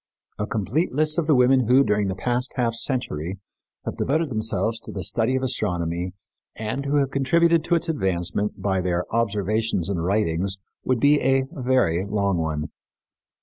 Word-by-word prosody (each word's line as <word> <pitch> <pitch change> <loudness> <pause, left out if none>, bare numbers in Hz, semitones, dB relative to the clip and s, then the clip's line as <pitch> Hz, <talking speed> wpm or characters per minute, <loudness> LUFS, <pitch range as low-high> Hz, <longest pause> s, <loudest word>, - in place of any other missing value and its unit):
A 105 - -1
complete 115 - -1
list 155 +4 +1
of 160 - -1
the 155 - +5
women 125 -1 +4
who, 130 +3 +6
during 105 -3 +1
the 95 - -2
past 125 +5 -2
half 120 -3 +1
century, 100 - -2 0.5
have - - -4
devoted 155 +2 0
themselves 110 0 -1
to - - -10
the 95 - -5
study 110 +5 +1
of 130 - -1
astronomy 90 -7 -1 0.4
and 110 +6 -4
who 145 - +1
have 140 -2 +2
contributed 165 +4 +3
to 175 - +2
its 170 +1 -1
advancement 95 - -1
by 95 -1 0
their 90 0 -1
observations 110 -3 0
and 90 -4 -1
writings 95 0 0 0.3
would 130 -2 +1
be 145 +2 +4
a 135 +1 +3
very 125 - +1
long 100 -3 0
one. 80 -2 -2
110 Hz, 170 wpm, -24 LUFS, 95-135 Hz, 0.5 s, who